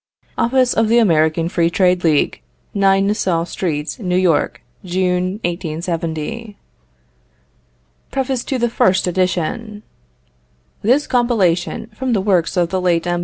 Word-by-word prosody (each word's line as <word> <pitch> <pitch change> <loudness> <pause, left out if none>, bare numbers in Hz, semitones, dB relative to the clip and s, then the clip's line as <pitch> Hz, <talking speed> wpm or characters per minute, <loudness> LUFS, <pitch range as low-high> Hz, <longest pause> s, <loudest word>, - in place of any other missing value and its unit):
OFFICE 255 +1 +2
OF 225 0 +2
THE 230 +2 +3
AMERICAN 165 -6 +3
FREE 170 -1 +1
TRADE 180 0 +2
LEAGUE, 155 -3 +2 0.3
9 195 -1 +3
Nassau 190 -5 0
Street, 160 -4 -3
New 180 -4 -1
York, 180 -4 +1 0.2
June, 180 0 0
1870. 170 +5 -4 1.5
PREFACE 265 -2 -2
TO 250 -3 -1
FIRST 190 -5 +2
EDITION. 185 +4 -2 1.0
This 255 +7 +2
compilation, 225 -5 0
from 255 +3 -2
the 200 - +1
works 185 -2 +1
of 175 -1 +2
the 185 0 -1
late 175 -2 +1
M. 175 0 0
185 Hz, 120 wpm, -18 LUFS, 170-225 Hz, 1.5 s, THE